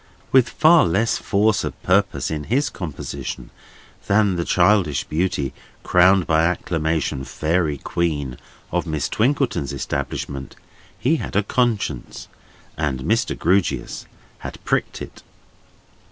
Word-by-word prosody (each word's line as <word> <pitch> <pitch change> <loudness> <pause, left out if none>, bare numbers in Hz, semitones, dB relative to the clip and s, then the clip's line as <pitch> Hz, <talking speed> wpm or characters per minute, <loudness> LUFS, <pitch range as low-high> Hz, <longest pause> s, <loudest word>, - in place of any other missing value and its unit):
With 130 -2 +5
far 160 +1 +5
less 100 +7 +1
force 105 +1 +2
of - - -5
purpose 90 -8 +1
in 75 -2 -3
his 135 +4 +1
composition 80 -7 -6 0.6
than 100 -1 +3
the 85 - -1
childish 90 -6 +3
beauty, 75 -4 -1 0.3
crowned 90 0 +4
by 80 0 +3
acclamation 80 -4 -1
fairy 80 +1 0
queen 70 -4 -2 0.3
of 90 0 -1
Miss 75 -4 -1
Twinkleton's 125 - 0
establishment, 70 0 -4 0.4
he 135 - +2
had - - -6
a 100 - +3
conscience, 120 0 -1 0.5
and 70 -4 -1
Mr. 110 - 0
Grewgious 95 +2 0 0.3
had - - -7
pricked - - -1
it. - - -11
90 Hz, 120 wpm, -22 LUFS, 75-105 Hz, 0.6 s, With